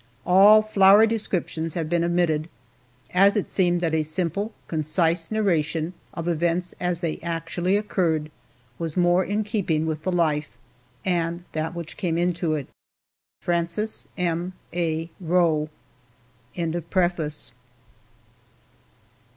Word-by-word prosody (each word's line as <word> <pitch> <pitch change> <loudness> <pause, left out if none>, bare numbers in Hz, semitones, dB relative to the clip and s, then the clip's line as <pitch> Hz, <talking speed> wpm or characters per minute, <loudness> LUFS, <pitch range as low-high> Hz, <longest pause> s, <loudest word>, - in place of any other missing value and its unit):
All 200 +4 +7
flowery 205 0 +6
descriptions 180 -7 -2
have 165 -3 -2
been 170 +1 +1
omitted, 170 -2 +1 0.6
as 195 +3 +5
it 205 - -1
seemed 175 -2 +1
that 165 -2 0
a 160 - +2
simple, 175 +7 -1 0.2
concise 165 +2 0
narration 170 -6 0 0.2
of 165 0 -4
events 170 +1 0
as 180 -1 -1
they 165 -2 -2
actually 170 +3 -1
occurred, 165 -7 -1 0.5
was 165 -1 -3
more 175 +1 +4
in 205 +3 -1
keeping 185 -7 -1
with 155 -1 -3
the 185 - -1
life, 155 -6 0 0.5
and 170 -1 -1
that 160 +2 -3
which 170 -2 -7
came 170 -4 -1
into 170 -2 0
it. 145 -3 -4 0.8
FRANCES 170 +5 -1
M. 175 0 -1 0.2
A. 165 -1 -2
ROE. 165 -3 +2
170 Hz, 115 wpm, -24 LUFS, 160-185 Hz, 0.8 s, All